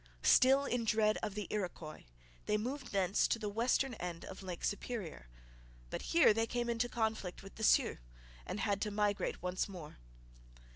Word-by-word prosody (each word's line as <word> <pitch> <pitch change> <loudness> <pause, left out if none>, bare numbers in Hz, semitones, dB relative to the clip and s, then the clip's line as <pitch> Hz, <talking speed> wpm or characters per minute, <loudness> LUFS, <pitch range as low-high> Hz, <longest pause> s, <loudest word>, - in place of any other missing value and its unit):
Still 270 +2 +6
in 245 -3 0
dread 215 -1 +3
of 210 -2 -3
the 210 -1 -3
Iroquois, 175 -6 -4 0.4
they 210 - +2
moved 255 +4 -4
thence 195 -1 +2
to - - +1
the 215 -2 -3
western 245 +4 +1
end 175 -5 -5
of 190 - -9
Lake 180 -3 -6
Superior; 200 - -3 0.6
but - - -3
here 335 -9 +6
they 225 +1 0
came 240 0 -1
into 235 +1 0
conflict 220 -7 -2
with 195 - -11
the 220 - -7
Sioux, - - +4 0.4
and 195 - -4
had 200 -1 0
to 210 - 0
migrate 205 -2 -1
once 180 +2 -1
more. 170 - -9
210 Hz, 175 wpm, -35 LUFS, 190-230 Hz, 0.6 s, Still